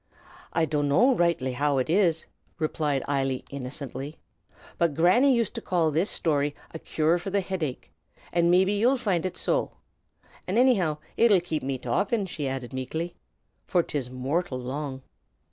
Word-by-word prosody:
"I 165 -1 +2
dunno 150 - +3
roightly 170 - +1
how 145 +2 +1
ut 130 - 0
is," 170 -2 +2 0.3
replied 150 -4 -1
Eily, 135 -2 -1
innocently, 140 +2 -5 0.6
"but 170 -4 +2
Granny 185 - +5
used 235 -5 +1
to - - -5
call 170 -4 +1
this 165 +7 +1
shtory 145 -3 +1 0.2
a 160 - -6
cure 160 +3 +1
for 175 - -5
the 200 +1 +1
hidache, 180 -8 -4 0.4
and 170 0 +3
mebbe 185 +2 +4
ye'd 240 +6 +2
find 185 -6 0
ut - - -6
so. - - 0 0.7
An' 185 - -1
annyhow 200 - +3 0.2
it 235 -1 +5
'ud 185 -4 +4
kape 160 -3 -2
me 135 0 -2
talkin'," 195 - 0
she 155 -6 -4
added 130 -1 -4
meekly, 160 +7 -3 0.5
"for 175 -2 +2
'tis 135 -6 -3
mortial 130 +4 -2
long." 130 +1 -5
160 Hz, 160 wpm, -26 LUFS, 140-185 Hz, 0.7 s, Granny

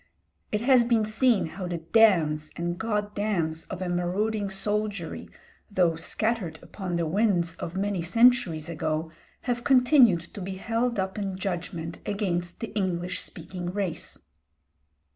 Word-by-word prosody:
It 210 - 0
has 250 0 +5
been 230 -2 +2
seen 225 0 +2
how 175 +3 -6
the 175 -1 -2
"damns" 160 -5 +3
and 175 +1 -3
"goddams" 205 -7 -1
of 190 -1 -4
a - - -3
marauding 195 +4 0
soldiery, 205 -2 -3 0.4
though 180 -5 +2
scattered 185 0 -1
upon 185 -4 -5
the 170 -1 0
winds 175 -1 +1
of 175 +2 -5
many 200 -2 0
centuries 205 -5 +3
ago, 160 -1 -2 0.3
have 245 -1 -2
continued 250 - +5
to 200 - -7
be 190 +1 -4
held 230 +4 -1
up 190 +1 -2
in 195 -2 -3
judgment 175 -3 -4
against 175 -4 -2
the 225 - -5
English 185 -3 -1
speaking 175 +1 -7
race. 190 -5 -3
190 Hz, 140 wpm, -27 LUFS, 170-215 Hz, 0.4 s, has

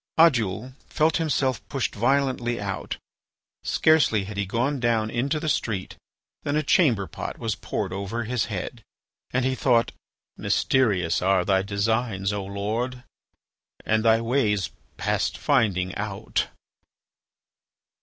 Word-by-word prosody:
Oddoul 125 - +3 0.2
felt 155 +1 +2
himself 135 -6 0
pushed 135 -4 -1
violently 120 0 +1
out. 100 -1 -4 0.6
Scarcely 150 -10 +3
had 100 +2 -7
he 100 -1 -1
gone 125 +7 0
down 115 -2 +1
into 135 +6 0
the 160 - -4
street 105 -9 -1 0.5
than 145 - -1
a 155 - +2
chamber 130 - +3
pot - - -6
was 115 -2 -1
poured 95 -1 -3
over 100 +5 -3
his 120 0 0
head; 110 +3 -5 0.5
and 125 0 0
he 130 - +2
thought: 120 -3 +2 0.5
"Mysterious 100 -11 +2
are 95 -1 +3
thy 95 -1 +3
designs, 100 0 0
O 100 -1 -2
Lord, 110 +6 -3 0.8
and 110 0 +2
thy 115 0 +4
ways 115 -6 +1 0.3
past - - 0
finding 100 -9 +1
out." 105 +1 -2
115 Hz, 125 wpm, -25 LUFS, 100-130 Hz, 0.8 s, thy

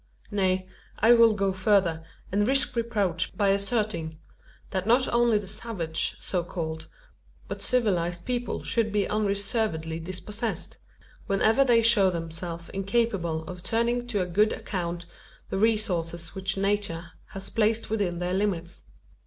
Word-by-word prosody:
Nay, 185 -2 +1 0.3
I 225 +3 +6
will 230 -2 +6
go 195 -1 +1
further, 185 -4 +2 0.3
and 205 +2 +2
risk 270 -1 +2
reproach, 200 -7 0
by 200 -2 +3
asserting: 200 -5 -1 0.5
that 190 +1 -2
not 245 +3 +5
only 235 -2 +4
the 205 - -4
savage, 180 -6 -2
so 180 -2 -1
called, 160 -2 -5 0.6
but - - -5
civilised 175 -8 0
people 245 -1 -2
should 225 -2 0
be 205 -1 +1
unreservedly 200 -5 -1
dispossessed 205 +6 -4 0.5
whenever 220 +6 +4
they 235 -3 +4
show 215 -4 +5
themselves 165 0 -5
incapable 195 -5 0
of 180 +2 -8
turning 235 +4 0
to 210 -5 0
a - - 0
good 210 +5 +2
account 175 -2 -4 0.5
the 195 - -1
resources 175 -7 0
which 195 0 -2
Nature 195 -4 -1 0.2
has 195 0 -7
placed 220 0 +1
within 200 -6 0
their 180 +1 -2
limits. 185 -4 -2
195 Hz, 135 wpm, -27 LUFS, 175-220 Hz, 0.6 s, I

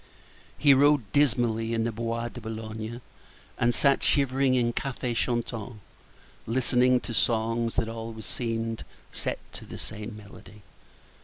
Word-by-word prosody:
He 145 -2 +6
rode 140 -5 +4
dismally 115 -5 +2
in 115 - +1
the 115 - 0
Bois 115 +1 -2
de 120 - -9
Boulogne, 110 +1 -6 0.6
and 120 - +4
sat 140 +3 +3
shivering 135 -1 +3
in 120 -1 +2
cafés 125 -2 -2
chantants, 120 -1 -2 0.7
listening 125 +1 +3
to 120 - -5
songs 115 0 +1
that 115 - +1
always 115 -1 -6
seemed 115 -1 -3 0.3
set - - -2 0.2
to - - -8
the - - -9
same 105 +1 -6
melody. 105 0 -14
115 Hz, 135 wpm, -27 LUFS, 110-125 Hz, 0.7 s, He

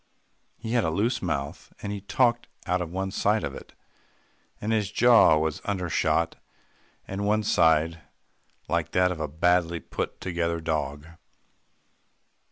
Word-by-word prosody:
He 110 - -6
had 120 -2 +2
a 80 - +1
loose 110 +9 0
mouth, 70 -6 -4
and 100 - -5
he 100 - -5
talked 120 +3 +1 0.2
out 90 +1 0
of 85 - -4
one 95 +2 -3
side 105 +3 +1
of - - -3
it, - - -11 0.9
and 105 - -2
his 105 -3 0
jaw 120 -9 +6
was 80 0 -1
undershot 90 -5 0 0.7
and 95 +1 -4
one 105 +1 +2
sided, 80 -4 +3 0.7
like - - -1
that 90 0 +3
of 85 - -5
a 80 - -2
badly 85 +2 +1
put - - -5
together 85 -2 -2
dog. 75 -2 -3
90 Hz, 145 wpm, -26 LUFS, 80-105 Hz, 0.9 s, jaw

